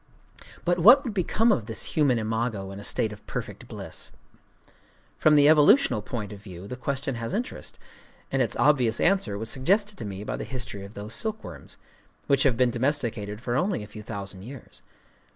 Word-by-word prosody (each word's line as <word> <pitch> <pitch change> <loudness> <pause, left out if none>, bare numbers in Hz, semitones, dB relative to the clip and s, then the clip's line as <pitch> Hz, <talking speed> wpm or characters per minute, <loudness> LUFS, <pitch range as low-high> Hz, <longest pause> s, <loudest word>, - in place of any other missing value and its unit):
But 175 0 +2
what 245 - +8
would 240 -6 -4
become 210 +4 +2
of 115 - 0
this 110 -2 -3
human 140 -6 +3
imago 110 -3 -2
in 100 - -8
a - - -9
state 110 +1 +1
of 105 - -14
perfect - - -6
bliss? - - -7 1.1
From 155 -1 +5
the 145 -1 +6
evolutional 150 - +5
point 105 -1 -5
of 100 - -11
view 95 -3 -10
the 125 - -5
question 135 +1 -3
has 115 - -3
interest; 240 +4 -5 0.5
and - - +1
its - - 0
obvious 125 -7 +3
answer 175 - +2
was 110 +2 -2
suggested 200 +10 +1
to - - -5
me 100 0 -6
by - - -3
the - - -4
history 125 -6 -5
of 100 +2 -11
those 105 +2 -6
silkworms,—which 180 - -4
have 130 -4 +3
been 125 -1 +3
domesticated 115 -5 -2
for 120 -1 -2
only 180 - 0
a - - -9
few 105 0 -10
thousand 100 -3 -7
years. 125 +4 -11
120 Hz, 185 wpm, -26 LUFS, 105-150 Hz, 1.1 s, what